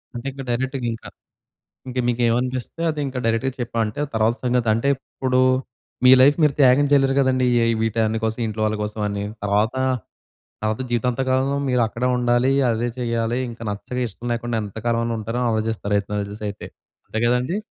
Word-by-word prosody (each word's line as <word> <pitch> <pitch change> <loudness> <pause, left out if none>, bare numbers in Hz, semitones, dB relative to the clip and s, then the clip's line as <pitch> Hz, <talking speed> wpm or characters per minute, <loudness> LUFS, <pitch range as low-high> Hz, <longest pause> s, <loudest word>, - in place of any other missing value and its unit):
అంటే 120 +2 -6
ఇంకా 135 0 -8
డైరెక్ట్‌గింకా. 120 -2 -2 0.8
ఇంకా 125 0 -3
మీకేమనిపిస్తే 125 +5 0
అదింకా 140 -4 -3
డైరెక్ట్‌గా 115 +3 0
చెప్పామంటే 115 +2 -2
తర్వాత 110 +1 +2
సంగతంటే, 120 0 +1
ఇప్పుడు 130 -1 -2 0.7
మీ 130 - +9
లైఫ్ 145 +2 +6
మీరు 145 -2 +4
త్యాగం 135 +2 +6
చేయలేరు 135 -1 +4
గదండీ! 130 -1 +2 0.2
ఏ - - +3 0.2
వీటన్ని 110 0 0
కోసం, 110 +2 -2
ఇంట్లో 110 0 -4
వాళ్ళ 110 0 0
కోసమని 105 -1 -3 0.2
తర్వాత, 105 +4 +1 0.9
తర్వాత 110 +3 -1
జీవితాంత 120 +2 0
కాలంలో 135 +2 +1
మీరక్కడే 125 0 +1
ఉండాలి, 120 +1 +2 0.2
అదే 120 +2 -1
చేయాలి 115 0 -1
ఇంకా 115 0 -9
నచ్చక 125 +5 -5
ఇష్టం 120 +4 -9
లేకుండా 120 0 -2
ఎంత 105 +1 -8
కాలమని 115 0 0
ఉంటారో 115 +3 -3
ఆలోచిస్తారయితే, 110 -2 -1
నాకుదెలి‌సై‌తే 105 0 -5 0.4
అంతే 110 - -3
గదండీ! 125 +9 +1
120 Hz, 140 wpm, -22 LUFS, 110-130 Hz, 0.9 s, మీ